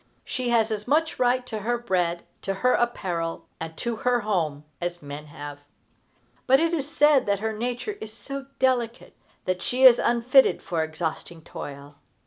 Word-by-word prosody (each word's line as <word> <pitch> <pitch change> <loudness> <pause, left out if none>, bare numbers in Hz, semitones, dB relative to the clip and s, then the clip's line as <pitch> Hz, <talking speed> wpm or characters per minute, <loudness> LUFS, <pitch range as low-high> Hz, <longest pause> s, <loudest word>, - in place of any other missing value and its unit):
She 250 -1 -2
has 225 -2 +3
as 210 0 -3
much 320 +4 +1
right 250 0 +2
to 220 -3 -4
her 240 +4 0
bread, 180 -7 0 0.2
to 195 - -2
her 250 +6 +2
apparel, 175 -8 -1
and 160 0 -6
to 235 -1 -2
her 245 +1 +1
home, 165 -9 -1 0.2
as 175 -1 -4
men 145 +1 -7
have. 145 0 -8 0.9
But 265 +1 +6
it 330 +1 +1
is 290 -3 -1
said 295 -5 +4
that 200 0 +2
her 220 +1 -2
nature 245 - -3
is 220 - -6
so 275 +4 -7
delicate 245 -3 0 0.3
that 185 0 -1
she 255 +6 0
is 250 -2 +9
unfitted 240 +3 +4
for 165 -3 -1
exhausting 160 +1 -5
toil. 140 -1 -9
220 Hz, 170 wpm, -25 LUFS, 170-250 Hz, 0.9 s, is